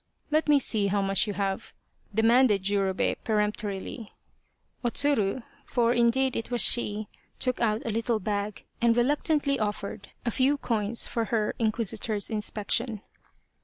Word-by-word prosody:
" - - -39
Let 310 0 +1
me 295 - +6
see 220 -6 +2
how 200 0 0
much 195 +3 +2
you 205 - -2
have? 195 -1 -3 0.2
" - - -24
demanded 225 -3 +4
Jurobei 195 -1 0
peremptorily. 210 0 -2 0.7
O 240 - +2
Tsuru, 250 -4 +1 0.2
for 235 -1 +1
indeed 245 +2 +2
it 230 - -4
was 245 -2 +2
she, 215 -3 +3 0.3
took 255 -1 -1
out 220 -1 0
a 230 - -1
little 225 +1 0
bag, 205 0 -4 0.2
and 235 0 +3
reluctantly 285 +2 +1
offered 205 -1 -4 0.2
a 235 - 0
few 270 +5 +2
coins 225 -3 +1
for 230 -1 -2
her 215 -2 -1
in 220 -2 +2
quisitor's 215 -1 -1
inspection. 215 +1 -1
225 Hz, 155 wpm, -27 LUFS, 205-245 Hz, 0.7 s, me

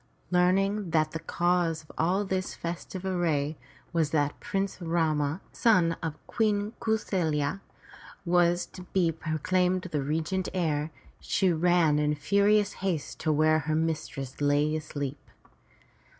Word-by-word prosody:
Learning 195 +2 +2
that 155 -1 +2
the 160 - -4
cause 175 -2 0
of 155 - -15
all 185 +5 +1
this 190 -1 -2
festive 175 +2 -6
array 160 -5 0 0.4
was 160 -3 +2
that 145 -2 0
Prince 195 -2 -3
Rama, 160 -1 0
son 180 -8 +3
of 160 -2 -3
Queen 210 -1 0
Kau 220 - +1
saFya, 160 -5 -1 0.7
was 175 0 +3
to 185 - -12
be 175 -4 +3
pro 155 0 -3
claimed 185 +3 +1
the 150 - 0
regent 160 +6 -1
heir, 155 -4 0 0.3
she 190 -2 +1
ran 165 -2 +3
in 150 0 +1
furious 200 +6 +3
haste 180 -6 -2
to 155 - 0
where 155 +1 +4
her 155 +1 -1
mistress 155 -4 -3
lay 145 +2 +2
asleep. 145 -2 -4
165 Hz, 135 wpm, -28 LUFS, 155-185 Hz, 0.7 s, where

